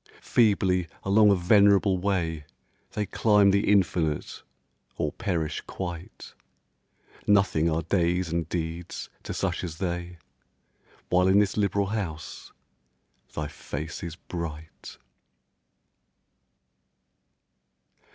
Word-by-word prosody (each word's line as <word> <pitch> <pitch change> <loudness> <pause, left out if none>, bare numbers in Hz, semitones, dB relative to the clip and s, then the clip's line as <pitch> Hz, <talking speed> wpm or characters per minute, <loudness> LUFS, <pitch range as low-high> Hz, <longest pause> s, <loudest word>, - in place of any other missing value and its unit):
Feebly 95 -6 +2 0.2
along 105 +2 +5
a 100 - +5
venerable 100 +1 +4
way 85 -5 -1 0.5
They 105 - -1
climb 105 -1 +4
the 100 +1 +2
infinite, 85 -6 +1 0.6
or - - -1
perish 85 -6 -2
quite; 85 -2 -7 0.9
Nothing 100 -6 +3
are 80 +1 -1
days 90 +1 +1
and 85 -1 -2
deeds 85 0 -4
to - - -7
such 90 -2 -2
as 80 -3 -5
they, 90 -1 -4 0.9
While 90 +1 +3
in 95 +1 +5
this 100 -1 +3
liberal 100 -1 +1
house 95 -7 -5 0.8
thy 75 -1 -2
face 75 +2 -6
is 85 -2 -6
bright. 80 -3 -8
90 Hz, 100 wpm, -27 LUFS, 85-100 Hz, 0.9 s, along